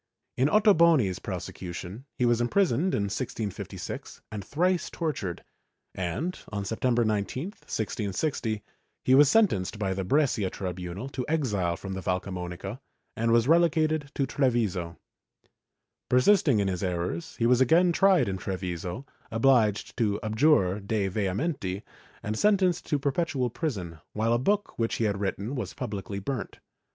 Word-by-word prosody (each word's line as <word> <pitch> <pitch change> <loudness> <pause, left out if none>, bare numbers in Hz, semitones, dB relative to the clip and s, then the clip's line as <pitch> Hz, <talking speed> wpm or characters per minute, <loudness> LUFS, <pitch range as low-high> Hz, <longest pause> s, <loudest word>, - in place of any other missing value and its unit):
In 130 +3 +2
Otto 210 +1 +5
boni's 155 - +4
prosecution, 90 +6 -6
he 125 - +2
was 120 0 +3
imprisoned 175 +4 +2
in 100 - 0
1656 105 -1 -5
and 105 -2 -5
thrice 180 - 0
tortured, 130 - -3 0.5
and, 95 - -3
on 100 -2 -3
September 120 +3 +1
19, 110 +5 -1
1660, 110 - -3 0.4
he 130 - +4
was 140 +1 +7
sentenced 145 - +2
by 100 -3 -1
the 95 0 -3
Brescia 120 -4 +2
tribunal 90 +4 -5
to 130 -2 -4
exile 105 - 0
from 95 -1 -6
the 95 - -4
Valcamonica 90 -1 -4 0.4
and 115 +1 0
was 115 +1 +4
relegated 155 -2 +3
to 140 - +1
Treviso. 110 - 0 1.1
Persisting 135 - +4
in 100 -1 +1
his 90 -2 -2
errors, 90 - -3
he 115 - 0
was 125 +1 +4
again 170 +7 +5
tried 190 - +4
in 95 -1 -2
Treviso, 90 +5 -4 0.2
obliged 115 -3 +2
to 105 -4 +1
abjure 110 -4 +3
de 100 -1 -1
vehementi 100 - -2 0.4
and 105 +1 -2
sentenced 190 -4 +2
to 150 - +1
perpetual 140 -3 -1
prison, 95 - -4
while 110 +2 +1
a 120 - +2
book 205 +6 0
which 115 0 0
he - - -1
had 100 -2 0
written 100 +4 -2
was 115 -9 -4
publicly 100 -1 -4
burnt. 120 +3 -4
115 Hz, 145 wpm, -27 LUFS, 95-145 Hz, 1.1 s, was